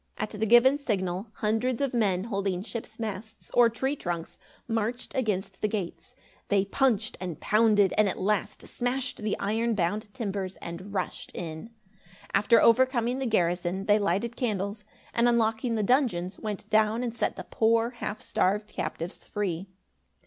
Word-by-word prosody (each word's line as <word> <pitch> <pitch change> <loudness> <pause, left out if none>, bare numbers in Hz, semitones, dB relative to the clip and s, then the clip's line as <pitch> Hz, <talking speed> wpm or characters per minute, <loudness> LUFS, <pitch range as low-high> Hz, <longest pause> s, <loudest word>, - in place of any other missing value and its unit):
At 215 - -3
the 220 +1 -1
given 250 +5 +6
signal, 190 -6 -2
hundreds 225 +3 0
of 275 -2 0
men 195 -6 +2
holding 195 -4 -2
ship's 220 0 -7
masts, 220 0 -6
or 240 -1 +6
tree 265 +5 -1
trunks, 175 - -5 0.3
marched 230 +1 -2
against 210 -6 -2
the - - +2
gates. 180 -5 -5 0.3
They 200 -1 +2
punched 220 0 +1
and 175 -5 -4
pounded 210 -2 +4
and 210 -2 +5
at - - -4
last 205 +1 -1
smashed 255 +1 -2
the 215 -1 -1
iron 225 +3 0
bound 205 +3 -1
timbers 200 -5 -3
and 170 +4 -8
rushed 195 - -3
in. 160 +4 -6 0.6
After 220 +4 +5
overcoming 245 +1 +3
the 265 - -1
garrison, 180 -2 0
they 210 +1 +4
lighted 200 +4 0
candles, 210 -3 -2 0.3
and 235 +1 +4
unlocking 230 0 +1
the 215 - 0
dungeons, 200 -7 +1
went 210 -1 -5
down 215 +2 +3
and 235 -2 -2
set 235 - -1
the - - -6
poor 230 +1 +3
half 220 -3 -5
starved 210 +3 0
captives 170 +2 -5
free. 195 -3 -2
215 Hz, 155 wpm, -28 LUFS, 195-235 Hz, 0.6 s, given